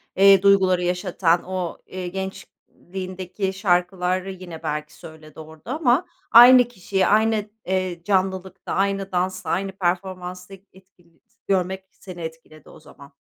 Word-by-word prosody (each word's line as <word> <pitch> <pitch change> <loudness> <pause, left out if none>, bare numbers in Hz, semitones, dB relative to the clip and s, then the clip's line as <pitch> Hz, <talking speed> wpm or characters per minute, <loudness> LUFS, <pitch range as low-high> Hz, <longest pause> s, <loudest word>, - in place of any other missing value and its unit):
eee, 195 -1 +6
duyguları 190 -2 +4
yaşatan, 180 -1 0
o, 185 -2 -4
eee, 185 -1 -6
gençliğindeki 190 0 -6
şarkıları 185 0 0
yine 175 -3 -10
belki 150 0 -4
söyledi 155 -1 -13
orada 160 +7 -10
ama 290 0 +2 0.3
aynı 245 +2 +9
kişiye 190 -4 -1
aynı, 215 0 +2 0.2
eee, 185 -2 -2
canlılıkta 190 0 -2
aynı 195 0 -1
dansta, 185 -1 -2
aynı 195 +3 -1
performansta 180 0 -4 0.2
etkili 180 -3 -24 0.3
görmek 190 0 0
seni 180 -3 -11
etkiledi 160 -2 -10
o - - -15
zaman. 140 +1 -16
185 Hz, 120 wpm, -22 LUFS, 175-195 Hz, 0.3 s, aynı